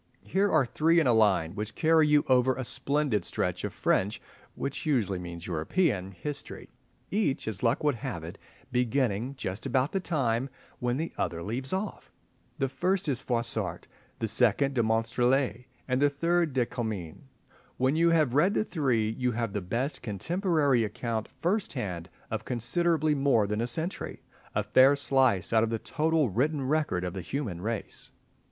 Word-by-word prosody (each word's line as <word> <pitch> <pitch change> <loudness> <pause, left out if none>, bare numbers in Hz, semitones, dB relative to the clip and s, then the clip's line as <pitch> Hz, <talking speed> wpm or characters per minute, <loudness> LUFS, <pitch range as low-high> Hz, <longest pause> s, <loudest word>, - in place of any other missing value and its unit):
Here 200 +1 +1
are 155 -4 +4
three 165 +7 +3
in 160 - +2
a 125 - +4
line, 95 -7 +3
which 105 +1 -5
carry 160 -1 +4
you 150 -1 +4
over 130 0 +4
a 130 - -4
splendid 140 - 0
stretch - - -1
of - - -2
French 100 +3 0 0.4
(which 140 - -4
usually 115 - 0
means 85 -1 -7
European) 95 - 0
history, 145 +10 -6 0.4
each, 195 - 0
as 105 -4 -4
luck 120 +4 +1
would 150 -1 +3
have 85 -8 -5
it, 85 +5 -8 0.3
beginning 125 0 0
just 95 -4 -4
about 130 +1 +1
the 195 - 0
time 135 -8 0 0.3
when 125 +1 0
the 160 +3 -3
other 85 0 -2
leaves 125 +7 -3
off. 190 +2 -4 0.5
The 135 - +1
first 180 +8 -1
is 135 -4 0
Froissart, 115 -5 -1 0.3
the 115 - -2
second 125 +5 +3
de 125 - +2
Monstrelet, 120 +2 +1 0.2
and 130 +1 0
the 145 - +5
third 165 +1 +1
de 125 -2 +2
Comines. 110 -10 -5 0.6
When 130 +3 +2
you 170 +1 +4
have 155 -7 +3
read 175 +9 +3
the - - +1
three 125 - 0
you 125 -1 +1
have 115 -3 -2
the 105 - -2
best 120 - -2
contemporary 145 - +1
account 110 +1 -3
first 180 +10 -2
hand 90 - -4 0.2
of 110 -1 -2
considerably 155 +7 +1
more 135 -6 +3
than 105 +2 -2
a 120 - 0
century—a 160 +9 -4
fair 135 +2 +5
slice 130 -8 +2
out 110 - +5
of 115 - +1
the 115 - -1
total 155 0 0
written 140 +6 0
record 150 -11 0
of 90 -1 -3
the 95 - -4
human 105 - -4
race. 110 +1 -4
125 Hz, 170 wpm, -28 LUFS, 110-150 Hz, 0.6 s, the